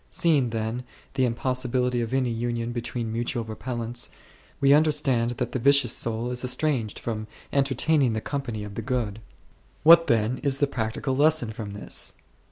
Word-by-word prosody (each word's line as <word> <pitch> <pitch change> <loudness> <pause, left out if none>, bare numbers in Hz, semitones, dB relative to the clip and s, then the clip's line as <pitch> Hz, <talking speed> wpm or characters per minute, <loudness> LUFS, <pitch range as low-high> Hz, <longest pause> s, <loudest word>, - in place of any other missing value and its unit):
Seeing, 145 -7 +2
then, 115 +2 -3 0.3
the 130 -2 +2
impossibility 125 0 0
of 115 0 -3
any 130 -2 +1
union 120 0 -2
between 120 -1 -3
mutual 120 0 -2
repellents, 120 +1 -4 0.5
we 140 0 +5
under 155 +1 +5
stand 120 -5 +1
that 125 - -2
the 130 - -2
vicious 140 -1 +4
soul 115 +1 -1
is 125 0 -1
estranged 125 -4 0
from 110 -2 -4 0.3
entertaining 140 -1 +2
the 110 - -1
company 120 -4 -4
of 105 -1 -8
the 115 - -4
Good. 115 -3 -2 0.6
What 165 +1 +8
then 115 0 +1
is 140 -2 +1
the 145 - +3
practical 130 +1 -2
lesson 150 -4 +3
from 105 -2 -7
this? 105 - -3
120 Hz, 165 wpm, -26 LUFS, 115-135 Hz, 0.6 s, What